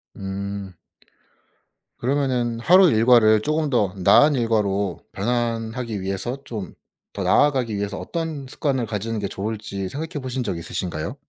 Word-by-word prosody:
음. 100 0 -5 1.2
그러면은 125 -3 0
하루 180 +8 +6
일과를 110 -1 +5
쪼금 155 +4 0
더 105 -8 +1
나은 145 +10 +6
일과로 100 - 0
변환하기 115 0 -2
위해서 95 +7 -3
좀 105 - -6 0.4
더 - - -3
나아가기 130 -7 +2
위해서 100 0 -3
어떤 160 -5 -4
습관을 130 -3 -1
가지는 110 +1 -3
게 100 - -2
좋을지 100 -1 -4
생각해 155 - -5
보신 130 -1 -3
적 90 - -3
있으신가요? 85 - -4
115 Hz, 305 characters per minute, -23 LUFS, 100-130 Hz, 1.2 s, 하루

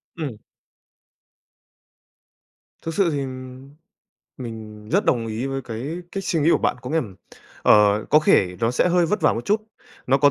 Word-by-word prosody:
Ừm. 145 -10 -5 2.5
Thực 165 - -3
sự 190 -2 +2
thì, 145 - -1
ừm, 130 0 -8 0.7
mình 110 -3 -8
rất 200 - +2
đồng 115 -2 +1
ý 110 +4 -3
với 135 0 -3
cái 115 +3 -6 0.3
cách 195 -1 -4
suy 165 -3 0
nghĩ 155 - +4
của - - +4
bạn. - - 0
Có 125 - -6
nghĩa, 160 - 0
ừm, 110 - -2 0.5
ờ, 105 0 +5
có 150 - +7
thể 90 -11 +3
nó 115 +1 +2
sẽ 125 - +2
hơi 175 -1 +3
vất 210 +4 0
vả - - +4
một 115 - -4
chút, 210 +2 +2 0.5
nó 135 +2 +3
có 145 0 +5
130 Hz, 180 wpm, -23 LUFS, 115-160 Hz, 2.5 s, có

